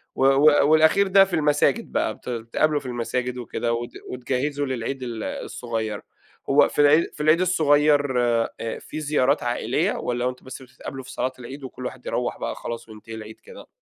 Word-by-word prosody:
و 135 - +2
و 135 +3 +6 0.2
والأخير 160 +6 +5
ده 195 0 +6
في 190 - -11
المساجد 150 +9 +1
بقى، - - 0
بت - - -10
بتتقابلوا 125 +6 0
في 140 - -16
المساجد 125 +1 -3
وكده، 120 -1 -2
وت 120 +1 -4 0.2
وتجهِّزوا 135 +3 -2
للعيد 130 0 -3 0.4
الصغير، 110 -3 -4 0.5
هو 145 +1 +6
في - - +1
العي 150 +3 +6
في 150 - -5
العيد 155 +3 +4
الصغير 145 -6 +3
آآ، 115 -1 -1
في 155 - -7
زيارات 145 -2 +1
عائلية؟ 120 0 0
والَّا 120 0 -2
هو - - +2
أنتم 125 0 -10
بس 130 0 -9
بتتقابلوا 130 +1 -9
في - - -11
صلاة 130 - -2
العيد 130 +3 -9
وكل 130 -1 -8
واحد 125 -1 -7
يروَّح 120 0 -2
بقى - - -4
خلاص، 115 0 -7
وينتهي 110 +1 -10
العيد 110 0 -10
كده؟ 480 - -13
130 Hz, 180 wpm, -24 LUFS, 120-150 Hz, 0.5 s, و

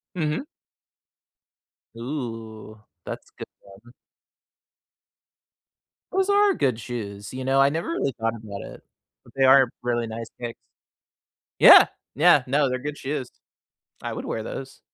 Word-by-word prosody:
Mhm. 155 - -1 1.5
Ooh, 115 -4 -6 0.3
that's - - -8
good - - -9
one. 100 +5 -17 2.2
Those 385 +1 +1
are 405 0 +4
good 130 - 0
shoes. 105 -4 -7
You 130 0 -5
know, 135 +1 +3
I 135 - +6
never 160 +4 -3
really 140 -5 -1
thought 115 0 -1
about 105 -3 -8
it, - - -11 0.4
but - - -19
they 135 - +3
are 130 -1 +7
really 120 -1 -1
nice 115 0 -6
kicks. 120 -1 -6 1.0
Yeah. - - +10 0.3
Yeah. 150 -1 +5
No, 140 +1 +2
they're 130 0 -2
good 145 +2 -5
shoes. 135 -2 -4 0.7
I - - -4
would - - -6
wear 110 - -3
those. 135 +4 -8
130 Hz, 135 wpm, -24 LUFS, 115-145 Hz, 2.2 s, Yeah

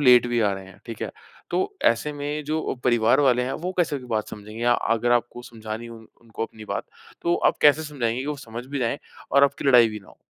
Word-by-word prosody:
Late 125 -3 +7
भी 120 -1 +1
आ 105 -3 +2
रहे 95 0 -6
हैं, 95 - -15
ठीक 115 -2 -7
है? - - -3 0.4
तो 390 +2 0 0.2
ऐसे 120 +6 -2
में 145 +1 -4
जो 155 +2 -1
अ, - - -2
परिवार 120 +1 +4
वाले 125 -3 +4
हैं 130 +2 -2
वो 185 - -1
कैसे 150 -5 +1
बात 110 -3 -2
समझेंगे 105 +2 -9
या 120 0 +4 0.2
अगर 120 +2 +1
आपको 120 0 0
समझानी 110 -1 -7
है 120 - -9
उन 115 -1 -12
उनको 115 -1 -5
अपनी 110 -1 -13
बात, - - -3 0.4
तो 170 - +2
आप - - +2
कैसे 150 +1 +6
समझाएंगे 125 -6 -2
कि 135 - -4
वो 150 0 -2
समझ 115 +2 -7
भी 140 +1 -4
जाए 125 +3 -1 0.3
और 140 +1 +7
आपकी 140 0 -1
लड़ाई 120 -3 +7
भी 105 -1 -7
ना 95 - -19
हो? - - -17
120 Hz, 250 wpm, -24 LUFS, 115-145 Hz, 0.4 s, Late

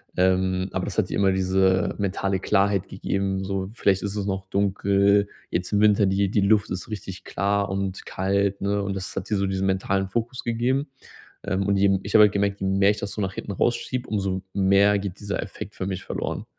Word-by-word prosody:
ähm, 95 0 +1
aber - - -2
das - - -6
hat - - +1
immer 95 -1 +2
diese 95 0 +2
mentale 95 -1 -1
Klarheit 100 0 +1
gegeben, 95 0 -2
so 95 -1 -3
vielleicht 100 -4 +1
ist 100 0 -3
es 100 -2 -2
noch 95 -1 -3
dunkel, 100 +1 +2 0.2
jetzt 90 +3 -3
im 105 - +3
Winter, 105 -1 +5
die 95 0 +1
die 105 - +2
Luft 105 +1 +3
ist 90 +3 -5
richtig 100 -3 -7
klar 100 +1 0
und 95 0 -3
kalt, 100 +1 0
ne? 100 +1 0
Und, 100 -1 -3
das 95 -1 -5
hat - - -4
die 105 - +1
so 100 -1 0
diesen 95 0 -1
mentalen 95 0 0
Fokus 120 +5 -3
gegeben. 125 +5 0 0.6
Ähm, 100 -1 -1
und 100 - +3
eben 100 -1 +3
ich 100 - -7
habe 110 -1 +9
halt 105 - +3
gemerkt, 100 0 0
je 95 - -1
mehr 95 +1 +3
ich 105 - -1
das 100 -1 -4
so 105 - -5
nach 95 -1 -1
hinten 100 - -5
rausschiebe, 120 +5 -1
um 105 - -1
so 95 -1 -2
mehr 100 +1 +4
geht 100 -1 -6
dieser 100 -1 -3
Effekt - - -8
für 95 - -3
mich 95 -1 -4
verloren. - - -4
100 Hz, 215 wpm, -24 LUFS, 95-100 Hz, 0.6 s, habe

